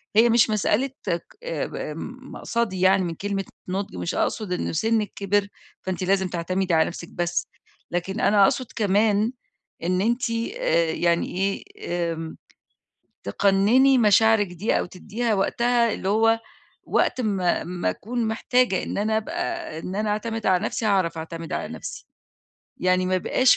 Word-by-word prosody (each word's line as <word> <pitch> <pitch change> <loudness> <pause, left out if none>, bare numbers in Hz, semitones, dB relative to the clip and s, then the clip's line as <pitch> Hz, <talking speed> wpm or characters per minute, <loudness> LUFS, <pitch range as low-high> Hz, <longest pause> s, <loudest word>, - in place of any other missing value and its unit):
هي 230 +2 +6
مش 235 0 +5
مسألة 215 +5 +1 0.2
ك 170 0 0 0.2
ب 160 -4 -3 0.6
مقصدي 220 -6 -2
يعني 190 0 +5
من 170 -2 -3
كلمة 195 +1 -3 0.2
نُضج 195 - -3
مش 90 -1 -3
أقصد 210 -5 -1
إنه 180 - -2
سنِّك 220 +5 +1
كِبِر، 200 0 +1 0.3
فأنتِ 185 0 -3
لازم 190 0 +2
تعتمدي 180 +1 -1
على 160 -1 +5
نفسِك 170 0 -7
بس، 175 0 -1 0.4
لكن 175 +2 -2
أنا 205 -1 +5
أقصد 255 +6 +2
كمان 210 +1 +2 0.5
إن 180 +2 +1
أنتِ 235 +4 +1
آآ، 230 - 0
يعني 170 +1 +1
إيه 195 +1 0 0.5
آمم، 160 0 -7 0.9
تقنِّني 205 - +4
مشاعرِك 220 -1 +5
دي 180 +5 0
أو - - -2
تدّيها 215 +5 -2
وقتها 235 +3 +2
اللي 190 - -3
هو 225 +2 +3 0.4
وقت 255 - +1
ما 195 -6 0
ما 175 0 -1
أكون 235 +1 -3
محتاجة 235 -1 +1
إن - - -4
أنا 215 +2 +1
أبقى 340 - -3
إن 180 +3 -6
أنا 210 0 0
أعتمد 225 +1 -2
على 185 -2 +3
نفسي 225 - -2
هاعرف 185 -5 +1
أعتمد 165 0 -6
على - - -2
نفسي. - - -8 0.7
يعني 185 0 +2
ما 185 - +1
يبقاش 250 +7 +4
200 Hz, 150 wpm, -24 LUFS, 180-225 Hz, 0.9 s, هي